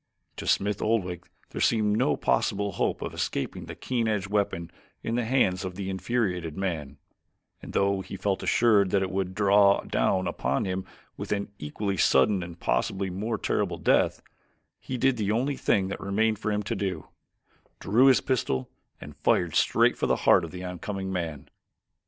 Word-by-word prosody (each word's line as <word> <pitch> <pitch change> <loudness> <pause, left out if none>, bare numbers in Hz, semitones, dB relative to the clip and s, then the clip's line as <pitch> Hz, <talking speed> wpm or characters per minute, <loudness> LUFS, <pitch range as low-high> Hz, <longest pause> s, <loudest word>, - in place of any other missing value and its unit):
To - - -6
Smith 100 0 +1
Oldwick 90 -6 -1 0.2
there - - -4
seemed 105 -2 +2
no - - +2
possible 100 0 0
hope - - -1
of - - -5
escaping 70 - -3
the - - -7
keen 120 -3 -1
edged 100 -3 -1
weapon 95 -5 -1 0.3
in 115 - -2
the 120 -1 0
hands 105 -7 +2
of 90 -1 -5
the 95 0 -4
infuriated 95 -5 -2
man, 80 -8 -3 0.6
and - - -9
though 100 -1 +1
he 95 +1 -8
felt 95 0 -1
assured 105 -5 +3
that 95 +1 +2
it 95 - -3
would 95 -1 -2
draw 100 -1 +4
down 95 +10 0
upon 70 - -1
him 95 0 -3 0.4
an 100 -1 -1
equally 95 +6 -3
sudden 90 +6 +4
and 85 -1 -8
possibly 95 +10 -1
more 110 +5 -2
terrible - - -1
death, - - +2 0.6
he 130 - -5
did 130 0 +2
the 105 -2 0
only 130 +6 0
thing 95 -6 +1
that - - -5
remained 110 +2 0
for 110 -1 -2
him 105 0 -1
to 100 - -3
do 95 -5 -3 0.7
drew 120 +7 +4
his 130 - +5
pistol 65 - -1 0.3
and - - -10
fired - - +1
straight - - +3
for - - -1
the - - +3
heart 90 - +6
of 85 - -5
the 90 +2 -8
oncoming 95 +1 -4
man. 80 -6 -4
100 Hz, 175 wpm, -27 LUFS, 90-105 Hz, 0.7 s, heart